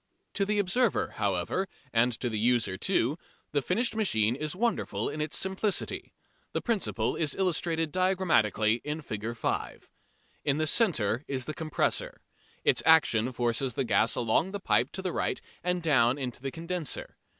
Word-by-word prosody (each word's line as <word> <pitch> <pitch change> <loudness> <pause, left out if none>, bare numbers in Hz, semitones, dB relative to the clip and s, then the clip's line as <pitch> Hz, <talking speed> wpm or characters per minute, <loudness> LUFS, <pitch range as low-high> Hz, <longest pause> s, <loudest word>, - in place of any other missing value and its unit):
To 200 - +1
the 210 +1 0
observer, 205 +4 +1
however, 100 - 0 0.3
and 120 +2 +4
to 125 - 0
the 110 -3 -2
user 120 -4 +2
too, 145 - 0 0.3
the 145 - +1
finished 225 - 0
machine 115 - +2
is 155 +4 -4
wonderful 230 +3 -1
in 155 - -4
its 150 0 -1
simplicity. 190 +2 -1 0.4
The - - -1
principle 230 -5 -1
is 155 -3 0
illustrated 165 -4 0
diagrammatically 120 - +2
in 150 +2 -3
Fig. 110 0 -5
5. - - -3 0.5
In 140 0 +1
the 155 - +1
centre 145 - +2
is 130 -2 -2
the 155 - -4
compressor. 155 -2 -1 0.4
Its - - +4
action 130 -7 +4
forces 120 +1 -1
the - - +1
gas 115 -2 +2
along 120 +9 +1
the 205 - -3
pipe - - +2
to 190 - -4
the 185 - -2
right - - -1 0.2
and 180 0 0
down 130 -5 +4
into 125 -3 -4
the 135 - -3
condenser. 170 +1 -4
150 Hz, 160 wpm, -29 LUFS, 120-185 Hz, 0.5 s, and